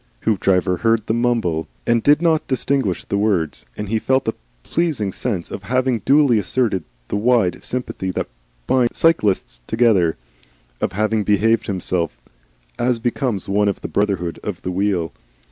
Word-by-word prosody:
Hoopdriver 95 -3 +2
heard 115 +2 +1
the 110 - 0
mumble 115 -9 0 0.2
and 115 -1 +2
did 150 +6 +4
not 160 -2 +2
distinguish 130 -7 0
the 100 - -1
words, 90 - 0
and 105 - -4
he 110 +2 0
felt 130 +2 +1
a 110 - +1 0.3
pleasing 150 - -1
sense 95 -5 -3
of - - -5
having 125 +3 0
duly 140 -4 +4
asserted 105 -2 0 0.3
the - - -2
wide 105 -4 +2
sympathy 125 -6 -3
that 90 - -2 0.4
binds 125 - +2
all - - -13
cyclists 95 - -2
together, 110 -8 +3 0.6
of - - -1
having 110 +2 +1
behaved 110 +3 +2
himself 90 -3 -2 0.6
as 125 0 +2
becomes 120 -3 -1
one 100 +1 +2
of 100 - -1
the - - -4
brotherhood 95 -5 -1
of 100 -5 -5
the 90 - -2
wheel. 90 -3 0
105 Hz, 160 wpm, -20 LUFS, 95-120 Hz, 0.6 s, did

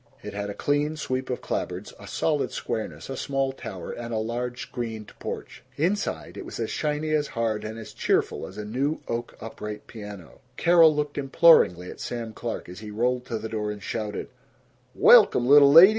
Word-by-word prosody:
It - - -6
had 100 0 -3
a 100 - -5
clean 145 +2 0
sweep 130 -3 -3
of 125 - -2
clapboards, - - -3
a - - -11
solid 150 -3 0
squareness, 115 -2 -4
a 135 - -4
small 135 0 -1
tower, 95 -9 -7
and 120 0 -6
a 110 - -1
large 120 +3 -3
screened 110 -3 -6
porch. - - -6 0.2
Inside, 190 +7 -1
it - - -5
was - - -8
as - - -2
shiny, 150 0 -1
as 150 -1 +2
hard, 110 -2 0
and 110 +1 -5
as 115 - -9
cheerful - - 0
as - - -12
a 105 - -5
new 135 +8 -1
oak 120 0 -4
upright 105 -1 -7
piano. 105 -6 -10 0.2
Carol 170 -3 +6
looked 145 -1 -2
imploringly 135 - +5
at - - -12
Sam 115 -2 -5
Clark 115 0 -5
as 90 - -9
he 105 0 -8
rolled 125 +4 0
to 115 - -2
the 110 +1 -5
door 105 -1 -3
and 105 -1 -6
shouted, 105 -2 -4 0.7
"Welcome, 120 - +7
little 140 0 +8
lady! 170 +6 +11
120 Hz, 190 wpm, -26 LUFS, 110-145 Hz, 0.7 s, lady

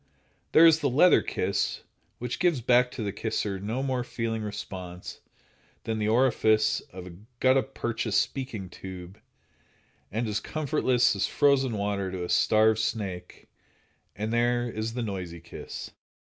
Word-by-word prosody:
There 165 - +8
is 160 -1 +6
the 145 -3 +1
leather 155 +8 +5
kiss, - - -1 0.4
which 125 0 -4
gives 175 -6 +2
back 125 +1 +4
to 120 - -6
the 100 - -2
kisser 105 -1 -2
no 110 +7 -3
more 130 -2 -1
feeling 115 -2 -3
response 90 -4 -7 0.6
than 110 -1 -2
the 105 - 0
orifice 110 -2 +3
of 90 0 -9
a 90 - -9 0.3
gutta 130 +1 +4
percha 120 -2 -4
speaking 115 -2 -1
tube, 95 +2 -9 0.9
and 115 +3 -1
as 105 0 -1
comfortless 130 -6 +1
as 100 - 0
frozen 135 -5 +2
water 100 -1 -1
to 90 -1 -4
a 90 - -5
starved 110 0 +4
snake; 95 -5 -4 0.7
and 110 +3 -3
there 120 +1 +2
is 115 0 -4
the 125 - -2
noisy 90 -5 -5
kiss. 85 - -8
110 Hz, 150 wpm, -27 LUFS, 100-125 Hz, 0.9 s, There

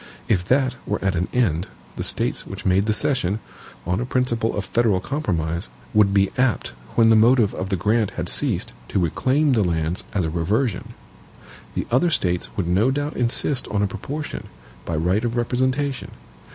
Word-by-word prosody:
If 95 -5 +2
that 130 +2 +2
were 105 - 0
at 95 - +2
an 90 0 -1
end, 95 -9 +1 0.3
the - - -3
States - - -1
which - - -8
made 95 +3 +3
the - - +3
cession, 110 -4 +1 0.5
on 90 +3 0
a - - -1
principle 120 -4 0
of 100 - -2
federal 110 -2 +2
compromise, 90 - -2 0.3
would 105 -2 +4
be 100 -1 +3
apt 125 -4 +1 0.3
when 115 -1 +5
the - - +6
motive 115 -1 +4
of 95 - -4
the 100 - +1
grant 105 +3 +1
had - - -2
ceased, - - +1
to - - -2
reclaim 130 - +2
the 110 -4 +3
lands 85 -1 -1
as 100 - 0
a 80 - -1
reversion. 100 +7 -1 0.8
The - - -1
other 130 +9 +3
States 90 - 0
would 95 -4 -1
no 95 +8 +3
doubt 145 +2 -2
insist 125 +2 +1
on 105 0 0
a - - +2
proportion, 145 +9 -6 0.4
by 85 - -2
right 90 +7 +1
of 120 0 -1
representation. 130 +3 0
110 Hz, 180 wpm, -22 LUFS, 90-125 Hz, 0.8 s, the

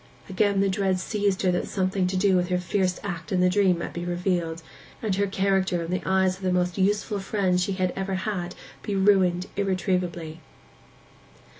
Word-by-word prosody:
Again 200 +1 +1
the 200 - +3
dread 190 -1 0
seized 200 0 -1
her 185 - +3
that 180 - -1
something 190 -1 0
to 185 +1 -1
do 190 0 +3
with 180 -1 +2
her 180 - +2
fierce 180 0 0
act 175 -4 -5
in 185 - +1
the 180 0 +4
dream 190 -2 +3
might 170 - -5
be 175 - -4
revealed, 175 -2 -1 0.4
and 215 -4 -1
her 200 +1 +1
character 190 -2 +1
in 165 - -5
the 185 - -1
eyes 190 -1 +2
of - - -18
the 185 -1 0
most 180 -1 +1
useful 205 +1 +1
friend 190 -2 0
she 195 +2 0
had 185 -1 -1
ever 195 0 -2
had 185 -2 -3 0.3
be 205 -2 -3
ruined 190 -2 +3
irretrievably. 180 -4 -1
185 Hz, 190 wpm, -25 LUFS, 180-195 Hz, 0.4 s, the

